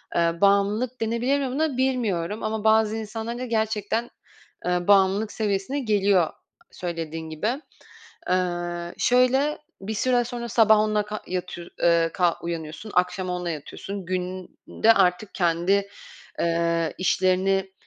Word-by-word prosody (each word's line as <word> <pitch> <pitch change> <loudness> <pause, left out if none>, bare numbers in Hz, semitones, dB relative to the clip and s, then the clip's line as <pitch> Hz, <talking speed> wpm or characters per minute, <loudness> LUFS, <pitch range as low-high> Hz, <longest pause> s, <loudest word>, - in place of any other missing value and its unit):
Eee, 170 0 +1
bağımlılık 205 +5 +2
denebilir 235 +5 +1
mi 270 - -1
buna 290 -1 -1
bilmiyorum 220 -7 -1
ama 215 0 -2
bazı 220 0 +3
insanların 225 +2 -5
da 255 - -3
gerçekten, 220 0 -1 0.6
eee, 180 +1 0
bağımlılık 200 +2 +4
seviyesine 210 +6 -1
geliyor 200 -7 +2 0.4
söylediğin 165 -2 -5
gibi. 215 - -2 0.7
Eee, 175 -1 -1
şöyle, 260 +4 +3 0.2
bir 215 +3 -4
süre 245 +2 +2
sonra 240 -1 -5
sabah 220 -1 +5
onunla 215 0 +2
ka 210 +1 -6
yatıyor 180 -1 -5
eee, 170 -1 +4
ka 175 -2 +2
uyanıyorsun, 165 +4 -5
akşam 180 +1 0
onunla 180 -1 -2
yatıyorsun. 175 +5 -6
Günde 185 +4 0
artık 185 +1 +1
kendi, 185 +3 +1 0.5
eee, 170 -1 0
işlerini 190 +1 +1
200 Hz, 125 wpm, -24 LUFS, 175-220 Hz, 0.7 s, sabah